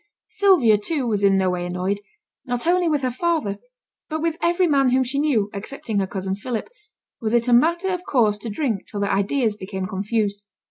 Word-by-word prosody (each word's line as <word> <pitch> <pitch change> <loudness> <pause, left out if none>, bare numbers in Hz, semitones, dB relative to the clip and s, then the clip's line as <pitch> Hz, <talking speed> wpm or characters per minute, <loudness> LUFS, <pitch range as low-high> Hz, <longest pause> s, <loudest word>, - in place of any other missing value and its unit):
Sylvia, 350 - +4
too, 280 +5 -2
was 210 -4 0
in 195 -1 +5
no 190 -1 +2
way 180 -1 -2
annoyed; 180 +3 -2 0.4
not 245 0 -3
only 350 0 +3
with 295 -3 0
her 255 - 0
father, 300 -7 -1 0.5
but 315 0 -2
with 325 0 0
every 345 +2 +2
man 275 -5 +3
whom 260 +1 +3
she 260 +3 -2
knew, 265 -9 +2
excepting 220 +2 -4
her 195 - 0
cousin 190 0 -3
Philip, 225 - -4 0.5
was 225 0 0
it 235 +1 +2
a 245 - +3
matter 340 +9 +3
of 360 -1 -2
course 220 - +2
to 225 - -5
drink 220 -3 -2
till 220 -5 -5
their 200 - 0
ideas 215 +3 +1
became 190 -1 -5
confused. 205 +1 -2
235 Hz, 200 wpm, -22 LUFS, 200-300 Hz, 0.5 s, in